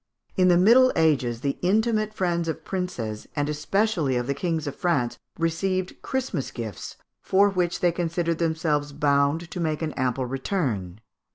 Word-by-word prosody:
In 185 Hz, -1 st, +4 dB
the 175 Hz, -1 st, +5 dB
Middle 240 Hz, +8 st, +6 dB
Ages 135 Hz, -8 st, +2 dB
the 140 Hz, -1 st, -2 dB
intimate 215 Hz, +3 st, +1 dB
friends 175 Hz, -5 st, -1 dB
of 160 Hz, 0 st, -4 dB
princes, 120 Hz, -, -4 dB
and 145 Hz, -1 st, 0 dB
especially 155 Hz, -, 0 dB
of 120 Hz, 0 st, 0 dB
the 140 Hz, -, 0 dB
kings 165 Hz, -1 st, -2 dB
of 145 Hz, -, -4 dB
France, 145 Hz, -10 st, 0 dB, 0.2 s
received 185 Hz, +3 st, -1 dB
Christmas 265 Hz, -, -2 dB
gifts, 110 Hz, -6 st, -7 dB, 0.2 s
for 200 Hz, +2 st, +4 dB
which 180 Hz, -1 st, -1 dB
they 175 Hz, -2 st, +4 dB
considered 170 Hz, -1 st, -1 dB
themselves 160 Hz, -3 st, 0 dB
bound 145 Hz, +3 st, +1 dB
to 180 Hz, -, -5 dB
make 160 Hz, -1 st, -1 dB
an 155 Hz, -, -1 dB
ample 130 Hz, 0 st, -1 dB
return. 125 Hz, -, -2 dB
165 Hz, 160 wpm, -25 LUFS, 140-185 Hz, 0.2 s, Middle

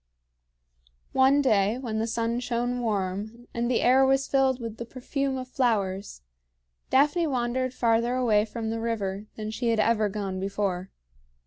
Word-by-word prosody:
One 270 Hz, +2 st, +4 dB
day 215 Hz, -3 st, +3 dB
when 230 Hz, -4 st, -3 dB
the 225 Hz, -, -1 dB
sun 230 Hz, +1 st, -1 dB
shone 245 Hz, 0 st, -1 dB
warm, 215 Hz, +1 st, -3 dB
and 235 Hz, +1 st, -1 dB
the 250 Hz, -, +2 dB
air 260 Hz, +2 st, +5 dB
was 270 Hz, 0 st, +2 dB
filled 265 Hz, -2 st, +2 dB
with 230 Hz, -2 st, -6 dB
the 235 Hz, -, -4 dB
perfume 265 Hz, +2 st, -3 dB
of 255 Hz, -1 st, -5 dB
flowers, 205 Hz, -, -1 dB, 0.7 s
Daphne 295 Hz, +5 st, +3 dB
wandered 255 Hz, -1 st, -1 dB
farther 235 Hz, 0 st, +1 dB
away 220 Hz, -5 st, +3 dB
from 225 Hz, 0 st, -4 dB
the 225 Hz, -, -2 dB
river 210 Hz, -3 st, -3 dB
than 215 Hz, 0 st, -5 dB
she 235 Hz, +2 st, -1 dB
had 225 Hz, -1 st, +1 dB
ever 215 Hz, -1 st, +2 dB
gone 195 Hz, -2 st, -4 dB
before. 195 Hz, -1 st, -2 dB
230 Hz, 155 wpm, -27 LUFS, 210-255 Hz, 0.7 s, air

